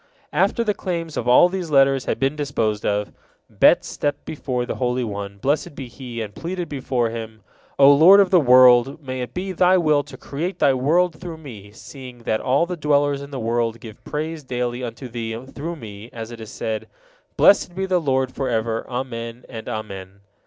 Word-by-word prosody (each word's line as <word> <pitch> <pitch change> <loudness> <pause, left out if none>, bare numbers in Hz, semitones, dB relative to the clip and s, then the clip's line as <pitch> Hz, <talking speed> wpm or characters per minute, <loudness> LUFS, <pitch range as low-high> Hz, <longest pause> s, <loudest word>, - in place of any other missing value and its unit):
After 235 - +2
the 210 -2 0
claims 170 -5 -4
of 120 - -3
all 125 +8 +7
these 180 -2 -4
letters 135 -2 +3
had - - -2
been 135 +2 +1
disposed 115 -8 -1
of, 105 0 -1 0.4
Bet - - +4
stepped 145 - -3
before 125 -5 -3
the - - -5
Holy 125 0 0
One, 100 -2 -5
blessed 140 +6 -1
be 135 -3 -7
He, 120 -1 -7
and 105 -1 -8
pleaded 175 - -5
before 130 -5 -1
Him: 110 -2 -8 0.3
"O 140 0 +8
Lord 175 +8 +8
of 195 -2 +4
the 180 - +6
world! 125 0 +6
May 130 -1 -4
it 125 -1 -7
be 190 +2 -3
Thy 185 +1 +4
will 155 -4 +3
to - - -12
create 170 +7 -4
Thy 135 - +4
world 160 +6 +1
through 170 -3 -7
me, 115 -10 -11
seeing 125 +3 -12
that 110 -1 -1
all 135 +6 +2
the 180 +1 -4
dwellers 145 -2 +1
in 140 - -9
the 135 -2 -6
world 115 0 -1
give 110 -2 -12
praise 155 +1 -4
daily 125 -1 -3
unto 120 +2 -6
Thee 115 -1 -5
through 150 +5 -6
me, 110 -5 -10
as 115 -2 -7
it 115 -1 -9
is 110 - -9
said, 110 -1 -4 0.5
'Blessed 180 -3 +4
be 190 +1 -1
the 185 -2 +1
Lord 130 -3 0
forever. 115 -3 -2
Amen, 120 -2 -5
and 115 -3 -7
Amen.'" 100 -2 -7
130 Hz, 195 wpm, -22 LUFS, 115-155 Hz, 0.5 s, O